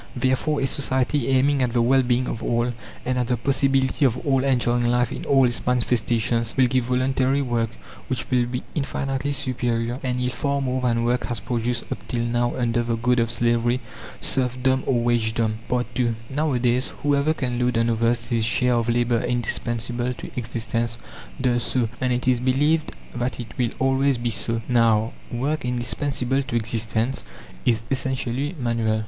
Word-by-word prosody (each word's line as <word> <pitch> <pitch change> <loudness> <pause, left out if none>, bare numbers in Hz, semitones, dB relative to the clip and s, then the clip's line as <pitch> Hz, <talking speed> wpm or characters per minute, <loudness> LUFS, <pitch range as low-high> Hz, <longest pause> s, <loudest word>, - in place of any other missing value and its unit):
Therefore 130 +4 +1
a - - +2
society 130 -1 0
aiming 135 +1 +3
at 125 -2 0
the 120 - +3
well 130 +3 +4
being 125 0 +1
of 115 - -4
all, 120 +1 0 0.3
and 125 0 0
at 125 - 0
the 125 -1 +1
possibility 135 +2 +1
of 125 -3 +3
all 135 -2 +2
enjoying 120 -2 +2
life 120 -1 +2
in - - -5
all 135 -2 +5
its 120 0 0
manifestations, 115 -1 +1
will 130 - +6
give 125 0 +1
voluntary 130 +2 +1
work, 120 -3 0 0.4
which 130 -2 -2
will 125 -1 +3
be 125 +1 -4
infinitely 135 -1 -2
superior 120 -2 -1
and 125 -1 -1
yield 125 0 -1
far 140 -1 -1
more 130 -1 -1
than 115 -2 +1
work 120 +1 0
has 120 -3 -3
produced 120 +2 -2
up - - -2
till 120 -1 -1
now 120 0 0
under 120 -1 +1
the 115 0 -1
goad 125 +2 +2
of 115 -1 +1
slavery, 120 +1 +1 0.4
serfdom, 130 0 +1
or 120 -3 +2
wagedom. 110 -2 +1
II 125 -1 0 0.2
Nowadays, 130 -4 +1
whoever 145 +2 +2
can 125 -4 -2
load 125 -1 +1
on 115 0 +2
others 115 +1 +1
his 115 -2 +1
share 125 +3 +2
of 120 -1 +1
labour 120 0 +2
indispensable 120 +1 -1
to - - -9
existence 115 -1 -2 0.4
does 125 -2 +2
so, 120 -2 0
and 130 -1 +1
it 125 +1 -1
is 125 -2 +3
believed 145 +5 +2 0.2
that 120 +2 -2
it 120 - -8
will 120 -2 +1
always 135 0 +2
be 120 0 -1
so. 115 +1 -1
Now, 115 -2 +3 0.2
work 140 +6 -1
indispensable 125 +2 -1
to 130 - -5
existence 115 +2 0 0.4
is 115 -1 +2
essentially 130 +3 -1
manual. 115 -3 0
125 Hz, 175 wpm, -23 LUFS, 120-130 Hz, 0.4 s, will